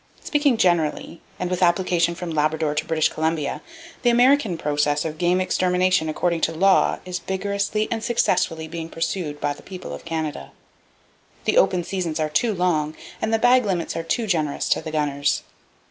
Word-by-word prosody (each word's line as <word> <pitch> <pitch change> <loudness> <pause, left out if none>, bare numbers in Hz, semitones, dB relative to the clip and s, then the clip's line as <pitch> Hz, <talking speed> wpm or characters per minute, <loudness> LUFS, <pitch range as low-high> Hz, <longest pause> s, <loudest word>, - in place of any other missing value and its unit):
Speaking 290 -5 +2
generally, 170 -3 0 0.2
and 180 - -2
with 180 0 -1
application 175 -1 +2
from 175 -1 -5
Labrador 155 0 0
to 150 - -2
British 160 -1 +2
Columbia, 160 -2 -2 0.4
the 240 - +3
American 245 -5 +4
process 145 0 0
of 155 -1 -5
game 180 +1 +2
extermination 185 -2 +1
according 170 +2 -1
to - - +2
law 190 +4 +3
is 180 -1 -4
vigorously 200 +2 -1
and 225 -1 -2
successfully 180 -8 0
being 165 0 -6
pursued 165 -2 -3
by 145 0 -1
the - - -14
people 185 -2 -8
of - - -8
Canada. 160 -3 -4 0.9
The - - +2
open 180 - +2
seasons 170 -3 -3
are 155 -1 0
too 220 +9 +1
long, 165 -5 0 0.3
and 220 - -1
the 225 - +3
bag 245 +2 +4
limits 185 -5 -2
are 165 - -1
too 225 +8 -1
generous 155 -7 -1
to - - +2
the - - -6
gunners. 145 -2 0
175 Hz, 175 wpm, -23 LUFS, 155-190 Hz, 0.9 s, American